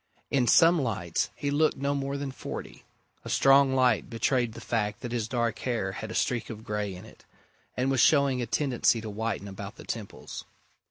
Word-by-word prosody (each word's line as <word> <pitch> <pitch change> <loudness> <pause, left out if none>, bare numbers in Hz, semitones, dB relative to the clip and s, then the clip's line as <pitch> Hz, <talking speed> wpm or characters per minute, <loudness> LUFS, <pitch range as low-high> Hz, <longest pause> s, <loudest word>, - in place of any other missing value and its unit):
In 130 -3 +2
some 165 +3 +6
lights 95 -10 -1
he 145 - -2
looked 155 +2 +2
no 140 +1 0
more 140 0 -2
than 140 -1 -4
forty: - - -8 0.4
a - - -7
strong 135 0 +5
light 125 -5 +2
betrayed 120 0 0
the - - -9
fact 105 -1 -2
that 120 - -5
his 115 -3 -1
dark 120 -2 -1
hair 115 -7 -1
had 110 +3 -6
a 110 - -6
streak 120 -2 0
of 110 -1 -8
grey 105 -3 -3
in 90 - -11
it, - - -16 0.5
and 130 +2 +1
was 135 - +1
showing 140 -4 +4
a 120 - -3
tendency 125 -2 +2
to 110 -1 -6
whiten 110 -1 -3
about 100 +1 -8
the - - -11
temples. 110 -4 -6
120 Hz, 200 wpm, -28 LUFS, 110-135 Hz, 0.5 s, some